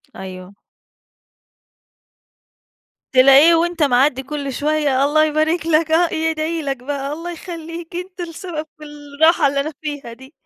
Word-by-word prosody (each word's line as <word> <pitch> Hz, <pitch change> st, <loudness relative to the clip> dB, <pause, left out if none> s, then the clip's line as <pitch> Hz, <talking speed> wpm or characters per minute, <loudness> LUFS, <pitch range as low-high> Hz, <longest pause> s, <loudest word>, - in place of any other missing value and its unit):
أيوه. 185 Hz, 0 st, -9 dB, 2.6 s
تلاقيه 275 Hz, +6 st, +7 dB
وأنت 340 Hz, -1 st, 0 dB
معدّي 265 Hz, 0 st, +2 dB
كل 280 Hz, -1 st, -5 dB
شوية 290 Hz, -2 st, +1 dB
الله 310 Hz, +2 st, +3 dB
يبارك 310 Hz, +2 st, 0 dB
لك 320 Hz, 0 st, +2 dB
آه، 335 Hz, +1 st, +2 dB
يدعي 320 Hz, +1 st, -1 dB
لك 275 Hz, -3 st, -3 dB
بقى، 280 Hz, +1 st, -4 dB
الله 340 Hz, +3 st, -6 dB
يخلّيك 335 Hz, 0 st, -8 dB
أنت 360 Hz, +1 st, -7 dB
السبب 335 Hz, -2 st, -6 dB
في 305 Hz, -, -13 dB
الراحة 295 Hz, +2 st, +1 dB
اللي 280 Hz, 0 st, -1 dB
أنا 305 Hz, +3 st, -2 dB
فيها 290 Hz, -6 st, -6 dB
دي. 265 Hz, +4 st, -15 dB
305 Hz, 130 wpm, -19 LUFS, 275-330 Hz, 2.6 s, تلاقيه